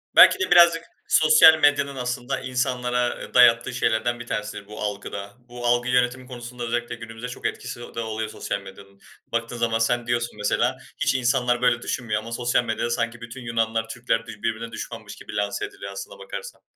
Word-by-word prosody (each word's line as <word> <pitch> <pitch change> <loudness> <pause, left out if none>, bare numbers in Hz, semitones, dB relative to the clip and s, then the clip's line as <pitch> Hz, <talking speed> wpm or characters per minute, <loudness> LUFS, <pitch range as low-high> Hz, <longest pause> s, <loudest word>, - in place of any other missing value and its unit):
Belki - - +8
de 380 - -1
birazcık 170 -1 +7 0.2
sosyal 155 0 +7
medyanın 140 -2 +3
aslında 125 +1 -3
insanlara, 125 -1 0
ııı, - - -10
dayattığı 115 -1 +5
şeylerden 120 0 0
bir 120 - -8
tanesidir 105 -2 -4
bu 105 +1 -9
algı 105 -1 -4
da. 100 0 -7 0.2
Bu 120 0 -7
algı 120 +1 +2
yönetimi 125 +1 +1
konusunda 120 -1 -8
özellikle 120 0 -2
günümüzde 115 +1 -8
çok 125 - -9
etkisi 125 -1 -6
de 120 -1 -8
oluyor 110 -1 -3
sosyal - - -4
medyanın. 100 0 -14 0.3
Baktığın 115 +1 -2
zaman 115 -1 +1
sen 120 +1 +1
diyorsun 120 -2 -1
mesela 120 +5 +1 0.2
hiç - - +1
insanlar 125 -1 +1
böyle 125 -1 +3
düşünmüyor 115 -4 -2
ama 115 +1 -9
sosyal 120 +1 +1
medyada 115 0 -2
sanki 120 0 -2
bütün 120 +2 -8
Yunanlar 115 -1 -1
Türkler 115 -1 -1
bir 110 -2 -10
birbirine 115 +1 -2
düşmanmış - - -7
gibi - - -10
lanse 105 - -1
ediliyor 400 -1 -9
aslına - - -8
bakarsan. 485 0 -8
120 Hz, 185 wpm, -24 LUFS, 115-125 Hz, 0.3 s, Belki